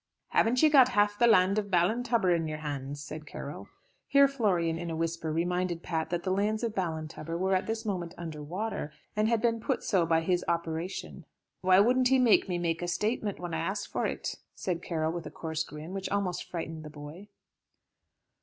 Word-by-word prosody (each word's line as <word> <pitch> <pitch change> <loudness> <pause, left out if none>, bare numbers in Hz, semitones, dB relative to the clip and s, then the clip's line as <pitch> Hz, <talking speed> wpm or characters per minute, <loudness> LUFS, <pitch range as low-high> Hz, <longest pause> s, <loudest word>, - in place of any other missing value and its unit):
"Haven't 245 +4 +3
you 310 - +8
got 265 -4 +7
half 205 0 +3
the 240 - +6
land 200 -2 +5
of 205 -1 -4
Ballintubber 195 +1 +2
in 165 -1 -1
your 155 0 -3
hands?" 145 -1 -5
said 155 +1 -8
Carroll. - - -7 0.4
Here 280 0 +6
Florian 180 -11 0
in 170 0 -4
a 165 - -3
whisper 165 0 -2
reminded 175 +1 -1
Pat 160 -2 -2
that 175 0 -2
the 185 - -1
lands 210 +4 0
of 230 -2 -1
Ballintubber 165 -3 -3
were 190 +2 +1
at 185 +1 +1
this 225 0 -3
moment 180 -5 -3
under 160 -3 -6
water, 180 +1 -4 0.2
and 215 +1 +2
had 230 -1 +1
been 230 -1 +2
put - - -1
so 180 -5 +2
by 165 0 +3
his 180 +1 +1
operation. 170 +2 -3 0.4
"Why 185 0 +5
wouldn't 250 +4 +4
he 265 +1 +4
make 235 -5 +4
me 175 -2 0
a 175 - -2
statement 210 +3 -1
when 175 -2 -5
I 160 - -1
asked 195 +5 -2
for - - 0
it?" - - -4 0.2
said 175 -2 -2
Carroll, 160 -3 -1
with 170 -1 -5
a - - -6
coarse 160 -1 -3
grin, 155 +3 -8
which 195 -1 -3
almost 190 -3 -2
frightened 160 -2 -5
the 150 - -8
boy. 150 +6 -10
180 Hz, 200 wpm, -29 LUFS, 165-210 Hz, 0.4 s, you